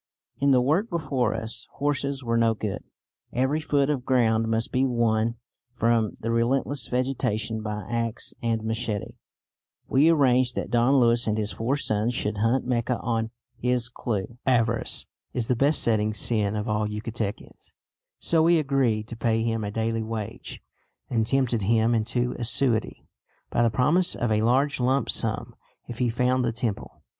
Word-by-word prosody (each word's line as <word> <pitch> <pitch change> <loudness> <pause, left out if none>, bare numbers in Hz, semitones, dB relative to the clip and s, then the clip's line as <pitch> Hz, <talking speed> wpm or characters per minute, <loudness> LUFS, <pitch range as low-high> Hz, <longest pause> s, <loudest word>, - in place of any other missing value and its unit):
In 140 - +3
the 130 -2 +5
work 160 - +1
before 140 -9 -1
us 115 +1 -4
horses 140 -1 -1
were 115 -1 0
no 115 -1 +3
good; 105 -2 -4 0.5
every 130 +5 +1
foot 145 -3 +1
of 145 -4 -1
ground 115 -3 +2
must 115 0 0
be 130 +1 +2
won 115 -2 +1 0.4
from 115 -2 +1
the 115 - -2
relentless 130 +4 0
vegetation 115 -4 -1
by 105 -2 -4
axe 115 -1 -1
and 115 -2 -1
machete. 110 -2 -3 0.7
We 145 +5 +4
arranged 130 -5 +3
that - - -3
Don 120 +3 +3
Luis 120 -1 +3
and 110 0 +1
his 105 -1 -1
four 115 +9 -1
sons 110 -2 0
should 105 -4 -2
hunt 115 +4 +1
Mecca 125 0 0
on 115 -1 -1 0.3
his 125 -1 0
clue. 120 -1 -4
Avarice 115 -3 +1 0.3
is 120 -3 -2
the 125 - +3
besetting 115 -6 +2
sin 105 -2 0
of 105 0 -3
all 105 0 0
Yucatecans, 105 0 -5 0.5
so 165 -1 +2
we 170 +1 +5
agreed 135 -8 +1
to 115 - -6
pay 115 0 0
him 115 -1 -1
a 105 - -3
daily 115 +1 -1
wage, 110 -2 -6 0.5
and 115 -2 +1
tempted 125 -4 +1
him 110 +3 +2
into 120 +2 0
assiduity 120 -1 0 0.5
by - - +1
the 120 - +4
promise 150 +11 +2
of 120 -2 -1
a 105 0 +2
large 130 +6 +2
lump 130 +1 +1
sum - - -2 0.3
if 120 - -7
he 125 -2 +2
found 125 +2 +1
the 120 - +1
temple. 115 -3 -4
115 Hz, 165 wpm, -25 LUFS, 110-130 Hz, 0.7 s, the